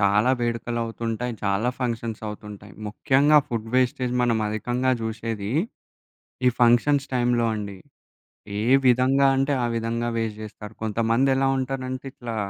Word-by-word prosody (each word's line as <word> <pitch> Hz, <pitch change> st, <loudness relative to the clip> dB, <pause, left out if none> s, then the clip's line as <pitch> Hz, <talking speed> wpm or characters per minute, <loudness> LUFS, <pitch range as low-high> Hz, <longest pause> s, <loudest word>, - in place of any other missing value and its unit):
చాలా 105 Hz, +5 st, +3 dB
వేడుకలవుతుంటాయి. 115 Hz, 0 st, -2 dB
చాలా 100 Hz, +4 st, +1 dB
ఫంక్షన్స్ 115 Hz, -3 st, -3 dB
అవుతుంటాయి. 105 Hz, -1 st, -9 dB
ముఖ్యంగా 140 Hz, +7 st, +4 dB
ఫుడ్ 115 Hz, -2 st, -3 dB
వేస్టేజ్ 125 Hz, -1 st, +1 dB
మనం 115 Hz, -2 st, +2 dB
అధికంగా 120 Hz, +4 st, -1 dB
జూశేది 110 Hz, -2 st, -4 dB, 1.0 s
ఈ -, -, +8 dB
ఫంక్షన్స్ 130 Hz, +4 st, +4 dB
టైంలో 120 Hz, -1 st, +2 dB
అండి. 100 Hz, -3 st, -5 dB, 0.8 s
ఏ -, -, -1 dB, 0.2 s
విధంగా 130 Hz, +2 st, +4 dB
అంటే 135 Hz, +2 st, +1 dB
ఆ -, -, +2 dB
విధంగా 115 Hz, +1 st, -1 dB
వేస్ట్ 110 Hz, -1 st, -2 dB
జేస్తారు. 105 Hz, 0 st, -9 dB
కొంతమందెలా 115 Hz, +5 st, +2 dB
ఉంటారంటే 130 Hz, 0 st, -3 dB
ఇట్లా 115 Hz, -2 st, -6 dB
115 Hz, 120 wpm, -24 LUFS, 110-130 Hz, 1.0 s, ఈ